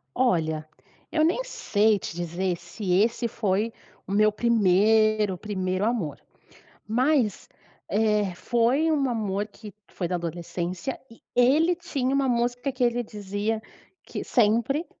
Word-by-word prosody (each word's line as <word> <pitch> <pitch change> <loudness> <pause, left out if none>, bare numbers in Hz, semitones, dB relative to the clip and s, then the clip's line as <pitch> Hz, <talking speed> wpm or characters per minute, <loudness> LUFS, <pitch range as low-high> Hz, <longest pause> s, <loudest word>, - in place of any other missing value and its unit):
Olha, 160 -10 +1 0.4
eu 310 -1 +2
nem 355 +10 +2
sei 215 - +1
te 165 - -6
dizer 175 +1 -2
se 180 +2 -4
esse 225 +5 +2
foi 210 0 0 0.4
o - - -6
meu 215 +1 +4
primeiro, 215 -1 +3
primeiro 185 -1 -2
amor, 215 - -1 0.7
mas, 250 - +1 0.4
eh, 210 -1 +1
foi 240 - +1
um 285 -4 +2
amor 210 -3 -1
que 210 0 -12 0.2
foi 175 - -3
da 180 - -2
adolescência 175 - -4
e 230 - -16 0.2
ele 300 +8 +4
tinha 275 -7 -2
uma 275 -1 +2
música 245 +2 0
que 260 0 -4
ele 245 0 +2
dizia 210 +1 -3 0.4
que - - -6
sempre, 245 +7 +2
215 Hz, 130 wpm, -26 LUFS, 190-245 Hz, 0.7 s, meu